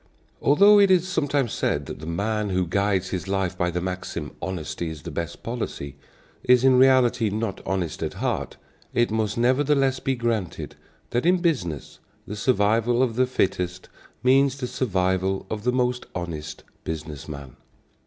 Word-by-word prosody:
Although 200 +9 +6
it 200 -1 +6
is 185 -1 +4
sometimes 145 - 0
said 70 0 -1
that - - -7
the 80 - -8
man 105 +5 -1
who 95 -1 +1
guides 95 +1 0
his 95 0 -4
life 95 -2 -1
by 90 -1 0
the 90 +1 -2
maxim, 95 +1 -4
"Honesty 85 -2 -4
is 80 -3 -8
the - - -6
best 85 -1 -5
policy," 110 - -4 0.5
is 125 0 +5
in 130 -1 +6
reality 130 -3 +4
not 105 -1 -3
honest 95 -4 -2
at - - -3
heart, - - -2 0.4
it 120 -2 +2
must 110 -1 -1
nevertheless 135 +2 +2
be 135 - -1
granted 115 -6 -2 0.4
that 120 +7 +1
in 180 +1 +5
business 115 - -2 0.3
the 105 - -6
survival 115 +2 +2
of 120 -4 -1
the 130 +1 +3
fittest 90 -6 -1 0.3
means 135 +1 +4
the 130 - -3
survival 95 -5 0
of 110 0 -4
the 125 - +3
most 125 0 0
honest 80 -3 -5 0.2
business 75 -3 -6
man. 70 -4 -8
105 Hz, 165 wpm, -24 LUFS, 90-130 Hz, 0.5 s, Although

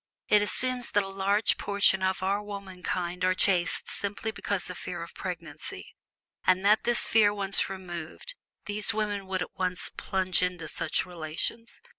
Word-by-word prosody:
It 210 -1 +6
assumes 250 +4 +3
that 205 - +2
a - - -5
large 195 +2 +1
portion 200 -1 +3
of 190 0 0
our 200 +2 +1
womankind 185 -3 -4
are 185 0 +3
chaste 180 -3 +2
simply 205 +2 -2
because 200 -2 -3
of 180 - -8
fear 175 -2 -5
of 170 - -11
pregnancy; 170 -5 -7 0.5
and 185 +1 +3
that 210 +2 +4
this 240 -1 +4
fear 215 -2 +5
once 200 -2 +3
removed 180 - -7 0.3
these 210 +1 0
women 205 -2 -2
would 185 -2 -1
at - - -11
once 180 -1 -1
plunge 185 -1 0
into 180 -3 -2
such 160 +1 -1
relations. 175 +7 -4
190 Hz, 160 wpm, -28 LUFS, 180-205 Hz, 0.5 s, It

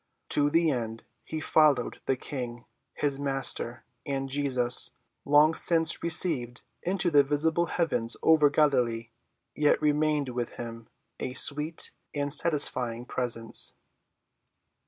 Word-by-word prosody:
To 145 0 +1
the 165 +1 +1
end 115 -3 -5 0.2
he 160 - -7
followed 150 -5 +1
the 135 - +1
King, 120 -3 -8 0.3
his 140 -2 -1
Master, 135 -3 -2 0.2
and 135 -1 -5
Jesus, 130 -3 0 0.4
long 150 +2 +4
since 165 -1 +2
received 150 -8 +4 0.2
into 180 -1 0
the 145 -2 +5
visible 160 +4 0
heavens 120 -11 0
over 155 -2 +4
Galilee, 125 -6 0 0.4
yet 150 -1 +1
remained 150 -2 -1
with 120 -1 -5
him, 115 -1 -10 0.3
a 125 - -5
sweet 150 +4 +2 0.2
and 145 0 -1
satisfying 130 -7 +2
presence. 115 -3 +1
140 Hz, 115 wpm, -26 LUFS, 125-155 Hz, 0.4 s, the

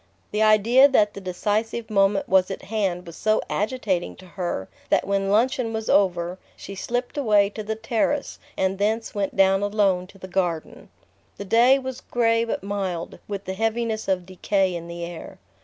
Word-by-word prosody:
The 210 - -1
idea 220 +5 +6
that 210 -7 +3
the 200 - -8
decisive 215 +5 -2
moment 195 -1 +2
was 185 -1 +3
at 195 - -6
hand 195 -5 -2
was 170 -1 -10
so 215 0 +1
agitating 210 -5 -1
to 185 - -15
her 175 - -4 0.2
that - - +2
when 195 0 0
luncheon 230 +2 +1
was 220 0 -2
over 180 -2 +2 0.2
she 200 - -9
slipped 245 +7 -3
away 210 -6 +3
to 215 - -6
the 220 +1 -3
terrace 240 +5 -1 0.2
and 190 0 0
thence 220 +2 0
went 200 -2 -2
down 195 0 +4
alone 200 -3 +1
to 195 - -17
the 185 - -9
garden. 175 -4 -3 0.5
The 200 - -6
day 240 +6 +5
was 260 -1 -6
grey 230 -1 +1
but 230 - -3
mild, 195 -4 -4
with 200 -1 -5
the 190 - -3
heaviness 225 +1 -1
of 185 -2 0
decay 190 0 0
in 170 -1 -6
the 170 0 -5
air. 170 -1 -9
200 Hz, 180 wpm, -24 LUFS, 190-225 Hz, 0.5 s, idea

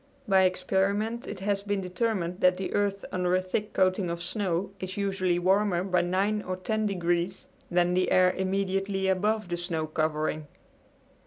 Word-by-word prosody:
By 190 -2 +5
experiment 200 +5 0
it 205 -2 -6
has 200 0 0
been 205 0 -1
determined 180 -1 -2
that 180 0 +4
the 190 - -4
earth 200 -1 0
under 180 0 +1
a - - +3
thick 185 +3 -3
coating 185 -1 +2
of 170 0 -4
snow 190 -2 -1
is 185 +1 -6
usually 190 -3 0
warmer 185 0 +2
by 180 -2 +2
nine 195 +4 0
or 185 -1 -4
ten 215 +3 -1
degrees 175 -1 -1 0.2
than 175 0 +2
the 185 0 +2
air 185 0 +5
immediately 195 +1 -1
above 210 +2 +1
the 175 - -1
snow 170 -2 -2
covering. 155 -1 -1
185 Hz, 165 wpm, -28 LUFS, 180-200 Hz, 0.2 s, By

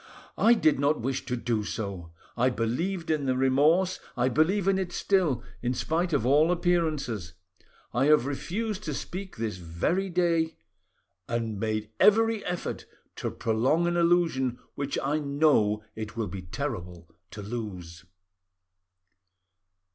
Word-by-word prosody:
I 235 +1 +6
did 155 - +3
not 145 +2 +2
wish 130 +3 -2
to 125 - -1
do 115 -3 -1
so. 100 -6 -5 0.2
I 125 +2 +3
believed 160 +10 -2
in 150 -3 0
the 130 0 +1
remorse; 150 +8 +3 0.2
I 125 +1 +2
believe 170 - +2
in 195 -1 +3
it 185 -2 -3
still, 170 - +1 0.2
in 125 +1 -1
spite 170 +6 0
of 140 -7 +1
all 150 +6 +4
appearances; 155 - 0 0.6
I 125 +3 +2
have 150 -4 +5
refused 200 +9 -3
to 150 - -2
speak 190 +6 -6
this 110 -4 -3
very 90 - -1
day, 170 -2 +1 0.7
and 115 -3 -2
made 110 0 -2
every 225 +1 +4
effort 180 -1 -4 0.3
to - - -2
prolong 130 +10 +1
an 175 0 0
illusion 170 -8 +2 0.2
which 140 -1 -3
I 145 +3 +1
know 140 -8 +2
it 110 +1 -6
will 115 - 0
be 95 0 -6
terrible 90 -5 -5 0.2
to 105 - -8
lose." 95 -7 -6
140 Hz, 140 wpm, -27 LUFS, 110-170 Hz, 0.7 s, I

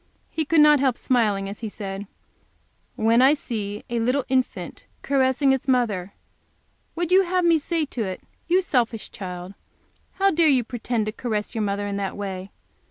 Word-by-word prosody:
He 315 - -1
could 320 +1 +4
not 300 -1 +7
help 260 -3 +1
smiling 210 -6 +1
as 200 +1 -7
he 225 - -4
said: 200 -1 -6 0.9
"When 230 +2 +3
I 270 +3 +6
see 210 -7 -5
a 235 0 -2
little 250 +4 +1
infant 260 -1 -2 0.2
caressing 270 0 +2
its 265 +1 -3
mother, 210 -8 0 0.8
would 345 0 -2
you 375 +1 +7
have 365 -1 0
me 335 -2 +4
say 325 +1 -1
to 255 -4 -5
it, 185 -1 -5 0.3
'You 360 +2 +4
selfish 240 - -1
child, 180 -1 -7 0.6
how 390 0 +2
dare 330 -2 +4
you 260 -4 +3
pretend 235 -1 -2
to 215 - -2
caress 215 -2 -3
your 225 - -2
mother 205 0 -1
in 200 0 -3
that 200 0 -3
way? 190 -1 -5
240 Hz, 175 wpm, -24 LUFS, 205-285 Hz, 0.9 s, not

